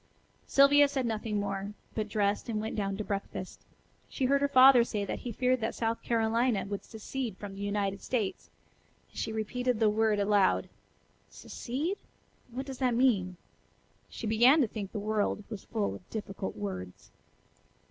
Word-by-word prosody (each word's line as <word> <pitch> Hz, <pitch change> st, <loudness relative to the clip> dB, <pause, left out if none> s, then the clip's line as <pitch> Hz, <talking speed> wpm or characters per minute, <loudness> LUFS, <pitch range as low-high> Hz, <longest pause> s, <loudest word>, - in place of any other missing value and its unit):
Sylvia 285 Hz, +1 st, +6 dB
said 270 Hz, -2 st, -2 dB
nothing 215 Hz, -2 st, -2 dB
more, 200 Hz, 0 st, -3 dB, 0.2 s
but 215 Hz, -1 st, -3 dB
dressed 205 Hz, +1 st, 0 dB
and 215 Hz, -2 st, -1 dB
went 220 Hz, +1 st, -4 dB
down 195 Hz, -2 st, -2 dB
to 215 Hz, -, -3 dB
breakfast. 200 Hz, -2 st, -5 dB, 0.5 s
She 265 Hz, -, -1 dB
heard 280 Hz, +2 st, +3 dB
her 285 Hz, -, +3 dB
father 260 Hz, -2 st, +8 dB
say 210 Hz, -3 st, -3 dB
that -, -, -4 dB
he 245 Hz, -, -5 dB
feared 255 Hz, +2 st, +1 dB
that 225 Hz, -, -2 dB
South 230 Hz, 0 st, -1 dB
Carolina 230 Hz, -1 st, +1 dB
would 200 Hz, 0 st, -5 dB
secede 225 Hz, -1 st, -5 dB
from 205 Hz, -1 st, -7 dB
the 195 Hz, -, -8 dB
United 200 Hz, -1 st, -1 dB
States, 225 Hz, -7 st, -2 dB, 0.6 s
and -, -, -26 dB
she -, -, -2 dB
repeated 240 Hz, +2 st, -1 dB
the 220 Hz, -2 st, +4 dB
word 220 Hz, 0 st, +2 dB
aloud: 200 Hz, -1 st, +2 dB, 0.6 s
"'Secede'? 305 Hz, -, -4 dB, 0.5 s
What 255 Hz, +3 st, -5 dB
does 270 Hz, -2 st, -7 dB
that 250 Hz, -3 st, +2 dB
mean?" 200 Hz, -8 st, +2 dB, 0.7 s
She -, -, -7 dB
began 240 Hz, +7 st, +5 dB
to 250 Hz, -, +3 dB
think 205 Hz, -2 st, -6 dB
the -, -, -5 dB
world 210 Hz, 0 st, -1 dB
was 210 Hz, -3 st, -7 dB
full 215 Hz, -3 st, -1 dB
of 180 Hz, -, -12 dB
difficult 200 Hz, -3 st, -5 dB
words. 95 Hz, -3 st, -6 dB
220 Hz, 170 wpm, -30 LUFS, 200-250 Hz, 0.7 s, father